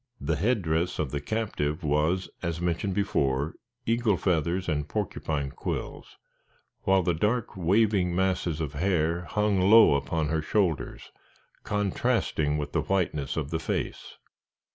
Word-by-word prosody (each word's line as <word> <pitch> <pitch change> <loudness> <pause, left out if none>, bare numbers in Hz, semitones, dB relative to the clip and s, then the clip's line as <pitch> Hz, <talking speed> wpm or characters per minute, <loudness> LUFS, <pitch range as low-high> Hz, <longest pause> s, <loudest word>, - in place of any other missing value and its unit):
The 75 +3 -1
headdress 90 - 0
of 75 -5 -2
the 70 - -2
captive 80 -5 -2
was, 75 +5 +1
as 85 -1 -2
mentioned 90 +2 -1
before, 75 -8 0 0.3
eagle 115 -4 +2
feathers 90 +1 0
and 75 -2 -1
porcupine 75 -9 -2
quills, - - -5 0.6
while 95 -1 +3
the 85 - +1
dark, 105 +7 0
waving 95 0 +2
masses 90 -4 0
of 75 -2 -3
hair 85 +1 0
hung 105 -2 +1
low 110 -7 +8
upon 75 +2 -1
the 80 -1 0
shoulders, 90 -2 -1 0.5
contrasting 90 -7 0
with 75 -1 -4
the - - +1
whiteness 80 -8 -1
of 75 -1 -2
the 80 - -1
face. - - -4
85 Hz, 135 wpm, -27 LUFS, 75-100 Hz, 0.6 s, low